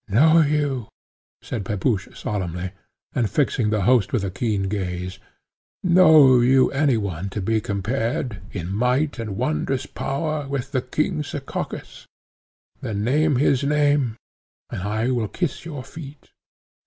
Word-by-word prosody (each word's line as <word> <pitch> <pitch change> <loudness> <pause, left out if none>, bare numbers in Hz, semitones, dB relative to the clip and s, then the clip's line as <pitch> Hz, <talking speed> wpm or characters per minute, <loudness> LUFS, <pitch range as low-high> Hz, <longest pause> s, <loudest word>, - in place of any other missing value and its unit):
"Know 155 +11 +5
you," 145 -5 0 0.6
said 110 -5 -4
Pepusch 100 +1 -1
solemnly, 90 -3 -3 0.4
and 115 -4 0
fixing 120 -1 +1
the 105 -2 0
host 110 -2 +3
with 115 -6 0
a 95 - -2
keen 105 0 -1
gaze, 90 -2 -3 0.6
"know 160 -8 +7
you 130 +2 +4
any 140 -3 +2
one 100 -3 -3
to 105 - -4
be 110 +3 0
compared, 110 +1 -2
in 90 -1 -4
might 125 +5 +1
and 105 -4 -4
wondrous 135 0 -1
power, 150 +1 -3
with 135 -1 -3
the 130 -4 0
king 155 +5 -1
Sekakis; 145 -1 -6 0.7
then 105 -1 -3
name 150 +5 +2
his 135 +1 +2
name 145 -5 +2 0.5
and - - -4
I 110 +5 -1
will 120 -4 0
kiss 170 - -3
your 145 -6 -6
feet. 140 0 -11
125 Hz, 140 wpm, -23 LUFS, 105-145 Hz, 0.7 s, know